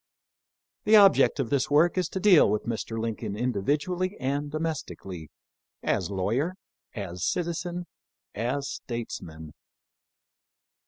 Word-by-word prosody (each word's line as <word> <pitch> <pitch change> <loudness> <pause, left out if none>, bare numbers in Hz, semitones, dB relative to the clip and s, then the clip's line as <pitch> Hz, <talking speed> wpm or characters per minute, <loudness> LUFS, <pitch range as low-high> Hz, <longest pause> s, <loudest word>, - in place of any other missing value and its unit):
The 215 +1 +6
object 200 -7 +6
of 130 -4 -1
this 140 -2 +1
work 155 +4 +4
is 185 -3 0
to 190 - -3
deal 185 - +6
with 105 +1 -1
Mr. 115 -1 -3
Lin 115 -1 -2
coln 100 - -5
individually 145 - -1
and 140 +2 -1
domestically; 145 - -5 0.5
as - - 0
lawyer, 115 - -1 0.4
as 90 -4 -5
citizen, 175 +1 -2 0.5
as 130 +6 -2
statesman. 80 - -6
140 Hz, 115 wpm, -27 LUFS, 105-170 Hz, 0.5 s, The